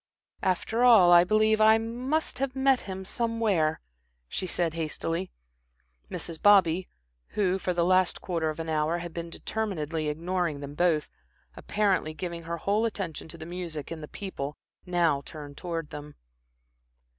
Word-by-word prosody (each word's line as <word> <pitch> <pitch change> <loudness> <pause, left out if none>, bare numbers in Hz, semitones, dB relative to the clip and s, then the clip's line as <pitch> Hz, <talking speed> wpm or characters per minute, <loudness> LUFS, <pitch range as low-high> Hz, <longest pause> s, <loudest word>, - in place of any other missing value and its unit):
"After 220 +6 0
all, 220 -8 +7
I 175 0 +8
believe 215 +3 +3
I 220 +1 +7
must 250 +5 -2
have 270 -1 -1
met 265 -1 +3
him 190 0 -5
somewhere," 215 -9 0 0.5
she 185 - -3
said 170 -2 +1
hastily. 165 +2 -3 0.8
Mrs. 165 -2 -3
Bobby, 190 -3 +5 0.5
who 190 -2 +2
for 185 - -1
the 170 -1 +1
last 185 -1 +3
quarter 165 -4 -1
of 155 - -5
an 165 - -4
hour, 155 +1 +1
had 175 -1 -6
been 170 0 -5
determinedly 165 -6 -3
ignoring 170 0 -1
them 140 0 -7
both, 160 -1 +2 0.5
apparently 195 -7 0
giving 170 -1 -5
her 170 0 -3
whole 205 +6 +1
attention 185 -9 -5
to 160 - -10
the 160 - -8
music 170 -4 -5
and 165 -1 -5
the 150 - -7
people, 150 -8 -6 0.3
now 170 -5 +2
turned 145 -2 -9
towards 165 -2 -5
them. 150 0 -8
175 Hz, 155 wpm, -28 LUFS, 160-205 Hz, 0.8 s, I